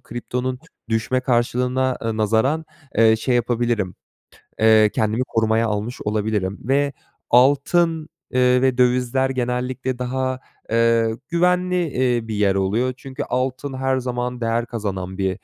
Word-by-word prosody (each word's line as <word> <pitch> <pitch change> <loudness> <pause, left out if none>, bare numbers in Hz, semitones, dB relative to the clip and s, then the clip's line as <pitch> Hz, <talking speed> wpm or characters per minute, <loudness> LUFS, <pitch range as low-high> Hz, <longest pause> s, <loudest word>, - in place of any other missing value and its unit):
kriptonun 125 +2 -4 0.3
düşme 115 +3 0
karşılığına, 125 +1 0
ııı, 115 -1 -2
nazaran, 115 +9 +1 0.3
eee, 110 -1 +6
şey 125 +3 -1
yapabilirim, 120 -5 0 0.7
eee, 110 -1 +6
kendimi 110 +3 0
korumaya 115 -1 +1
almış 105 +3 -3
olabilirim 105 -2 -1
ve 140 +3 +1 0.4
altın, 155 +6 +3 0.2
eee, 125 0 +3
ve 130 -1 +2
dövizler 125 +1 +2
genellikle 125 0 -2
daha, 130 +1 -2 0.3
eee, 115 -1 +3 0.2
güvenli, 180 +1 +2
eee, 125 -3 0
bir 110 - -3
yer 100 -2 +2
oluyor. 105 +7 0
Çünkü 135 -1 -6
altın 130 +2 -2
her 130 0 0
zaman 125 -1 -3
değer 115 +1 0
kazanan 95 -5 -4
bir, 95 -1 0
125 Hz, 130 wpm, -21 LUFS, 110-130 Hz, 0.7 s, eee